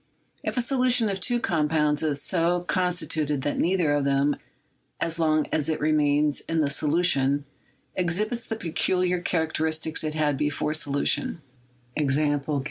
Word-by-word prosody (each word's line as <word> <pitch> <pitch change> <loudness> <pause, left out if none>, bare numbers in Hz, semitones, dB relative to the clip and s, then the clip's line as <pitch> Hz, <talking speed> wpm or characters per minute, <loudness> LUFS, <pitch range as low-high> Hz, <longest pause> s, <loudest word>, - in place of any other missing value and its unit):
If - - -3
a 245 - +2
solution 250 -3 +3
of 190 -1 -4
two 240 +5 0
components 150 -5 +1
is 150 -3 0
so 175 0 +1
constituted 165 -6 0
that 145 - -2
neither 170 -4 +1
of 145 -1 +1
them, 140 +1 +1 0.6
as 165 0 -2
long 155 -2 +2
as 155 -1 0
it 160 - -1
remains 150 -1 +2
in 165 0 0
the 150 -2 +1
solu 155 +4 +1
tion, 140 -3 +2 0.5
exhibits 210 +7 -1
the 225 - -3
peculiar 180 -1 0
characteristics 160 -2 0
it 155 0 -3
had 150 -3 0
before 150 +1 -1
solution 145 +1 0 0.3
— 125 0 -36
e. 150 -2 0
155 Hz, 150 wpm, -25 LUFS, 145-180 Hz, 0.6 s, solution